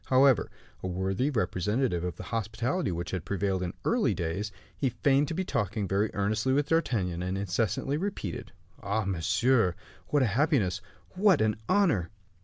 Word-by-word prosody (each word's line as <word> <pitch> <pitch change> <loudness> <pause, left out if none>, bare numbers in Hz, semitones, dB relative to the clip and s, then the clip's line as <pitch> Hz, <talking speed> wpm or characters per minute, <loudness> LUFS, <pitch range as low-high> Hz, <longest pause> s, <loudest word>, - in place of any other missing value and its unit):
However, 130 -1 +4 0.3
a - - -3
worthy 95 +8 0
representative 105 - 0
of 90 -1 -3
the - - -8
hospitality 115 - -1
which 85 +1 -4
prevailed 95 0 -1
in 90 -1 -3
early - - +2
days, 95 +6 -2 0.2
he 135 - 0
feigned 140 +4 +2
to 165 - -3
be 190 - 0
talking 105 - -1
very 100 +3 +1
earnestly 110 +6 +1
with 145 +1 +1
D'Artagnan, 100 - +1
and 90 +1 -2
incessantly 100 +8 -1
repeated: 175 - -4 0.3
"Ah! 100 +1 -1
monsieur, 100 +3 +2 0.3
what 145 -2 +2
a 110 -6 +1
happiness! 130 - +2 0.3
what 190 -4 +4
an 110 -1 +2
honor!" 165 - +3
105 Hz, 155 wpm, -29 LUFS, 95-135 Hz, 0.3 s, However